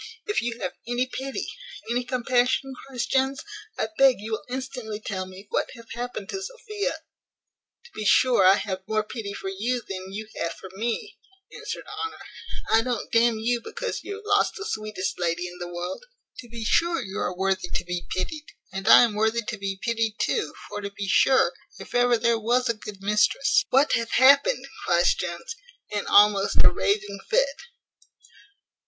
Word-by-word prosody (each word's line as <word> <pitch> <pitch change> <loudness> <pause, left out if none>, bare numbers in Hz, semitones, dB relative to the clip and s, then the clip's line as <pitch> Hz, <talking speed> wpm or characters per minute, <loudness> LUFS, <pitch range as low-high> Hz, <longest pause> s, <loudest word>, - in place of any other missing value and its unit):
"If 415 - 0
you 240 0 -3
have - - -2
any 245 +1 +1
pity, 265 +1 -4 0.5
any 245 +1 +1
compassion," 255 +1 +1
cries 255 -3 -3
Jones, 270 0 +1 0.3
"I - - 0
beg 270 -2 +7
you 215 +2 -7
will 215 -2 -2
instantly 250 -4 -5
tell 190 -3 -4
me 185 +2 -11
what - - 0
hath 230 -1 -11
happened 240 -4 -5
to 385 - -4
Sophia?" 425 -2 -3 0.9
"To 475 - -16
be 215 - -5
sure, 240 +1 +5
I 190 +1 +8
have 190 -2 -3
more 215 0 +1
pity 210 -1 -6
for 195 -1 -5
you 235 +6 -1
than 190 0 -6
you 215 +2 -6
have 170 0 -2
for 190 - -11
me," 235 - -3 0.4
answered - - -6
Honour; 430 +1 -5 0.6
"I 225 - +7
don't 245 -2 -3
d 230 0 +5
n 235 -2 +2
you 235 +2 0
because 485 - -4
you 405 - -5
have 425 +1 -11
lost 415 0 +2
the 405 - -6
sweetest 215 - -3
lady 175 0 0
in 180 0 -10
the 175 0 -6
world. 175 - -5 0.4
To 240 - -9
be 230 -1 -6
sure 335 +8 +3
you 200 -6 -5
are 180 0 -2
worthy 190 -1 0
to - - -1
be 175 0 -4
pitied, 300 +11 -3 0.3
and 195 +2 -4
I 230 - +10
am 235 -3 +2
worthy 220 +2 +1
to 220 +1 -4
be 195 -1 -3
pitied 225 -2 0
too: 445 - -1
for, 205 - -5
to 200 - -4
be 200 0 -6
sure, 260 +7 +4 0.2
if - - -11
ever 245 -1 +4
there 230 0 +2
was 245 +3 +2
a 235 - +2
good 210 -2 -10
mistress 210 +6 +3
" - - -65
"What 275 +3 +4
hath 230 0 0
happened?" 280 - +5 0.2
cries 175 0 +4
Jones, 170 - -5 0.4
in 205 -1 -2
almost 205 -1 +5
a - - +7
raving 200 0 -1
fit. - - +3
225 Hz, 190 wpm, -25 LUFS, 200-255 Hz, 0.9 s, I